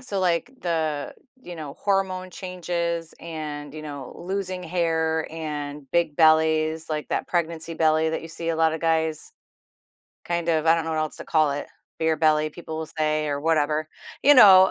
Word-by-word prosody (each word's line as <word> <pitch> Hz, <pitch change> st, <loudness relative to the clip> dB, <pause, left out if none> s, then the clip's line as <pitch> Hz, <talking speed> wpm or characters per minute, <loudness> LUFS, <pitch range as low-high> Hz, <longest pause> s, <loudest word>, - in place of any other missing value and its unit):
so, 210 Hz, -6 st, -4 dB
like, 175 Hz, +5 st, +1 dB
the, 155 Hz, -4 st, -2 dB, 0.3 s
you 175 Hz, -, -8 dB
know, 150 Hz, -3 st, -7 dB
hormone 190 Hz, -2 st, 0 dB
changes 170 Hz, -3 st, -3 dB
and, 150 Hz, -3 st, -6 dB
you 155 Hz, -, -7 dB
know, 145 Hz, -4 st, -7 dB
losing 185 Hz, 0 st, -3 dB
hair 160 Hz, -2 st, 0 dB
and 150 Hz, -3 st, -5 dB
big 165 Hz, -4 st, +1 dB
bellies, 160 Hz, 0 st, +3 dB
like 155 Hz, -1 st, -3 dB
that -, -, -2 dB
pregnancy 165 Hz, -1 st, -1 dB
belly 160 Hz, 0 st, +2 dB
that -, -, -3 dB
you 165 Hz, -, -8 dB
see 165 Hz, +1 st, -4 dB
a 165 Hz, -, 0 dB
lot 160 Hz, -1 st, +3 dB
of 160 Hz, -, -4 dB
guys, 160 Hz, -1 st, 0 dB, 0.9 s
kind 170 Hz, -1 st, -1 dB
of 160 Hz, -1 st, +1 dB
I 165 Hz, -, +6 dB
don't 165 Hz, -, -1 dB
know 165 Hz, -, -3 dB
what 160 Hz, -, -1 dB
else 155 Hz, -1 st, -2 dB
to -, -, -8 dB
call 155 Hz, -3 st, +3 dB
it, 145 Hz, -, -4 dB, 0.3 s
beer 160 Hz, 0 st, +2 dB
belly, 155 Hz, -1 st, +3 dB
people 160 Hz, 0 st, -7 dB
will 160 Hz, -, -3 dB
say 155 Hz, 0 st, +1 dB
or 145 Hz, -1 st, -1 dB
whatever, 155 Hz, 0 st, +1 dB, 0.4 s
you 290 Hz, +1 st, +8 dB
know. 190 Hz, -5 st, +9 dB
160 Hz, 185 wpm, -24 LUFS, 155-170 Hz, 0.9 s, know